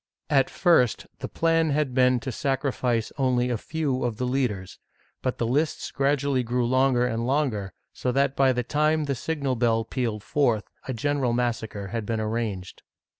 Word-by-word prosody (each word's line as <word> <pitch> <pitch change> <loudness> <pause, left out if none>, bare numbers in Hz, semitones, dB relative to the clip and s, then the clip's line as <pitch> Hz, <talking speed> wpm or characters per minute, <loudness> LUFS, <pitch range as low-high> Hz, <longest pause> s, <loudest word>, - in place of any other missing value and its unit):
At 135 -2 +4
first 165 - +3
the - - -4
plan 165 -1 +2
had 145 -2 0
been 125 -1 +4
to 130 - -4
sacrifice 130 -3 -1
only 125 -2 +2
a - - +1
few 145 -4 -2
of 120 -3 -2
the 125 - -1
leaders, 125 -8 -2 0.4
but 130 - -2
the 115 - -1
lists 145 +7 0
gradually 140 -1 +1
grew 120 0 0
longer 130 0 +3
and 115 -1 -1
longer, 125 -9 0 0.2
so 125 - -1
that 140 +1 +1
by 135 -1 +4
the 125 -1 -1
time 150 +4 +1
the 140 -1 -1
signal 140 0 -2
bell 115 -1 +1
pealed 115 -3 -3
forth, 120 -7 +1 0.2
a 130 - -2
general 135 0 0
mas 120 -1 +1
sacre 100 -3 -7
had 110 +1 -4
been 115 -1 -1
arranged. 110 -4 -3
125 Hz, 175 wpm, -25 LUFS, 115-140 Hz, 0.4 s, At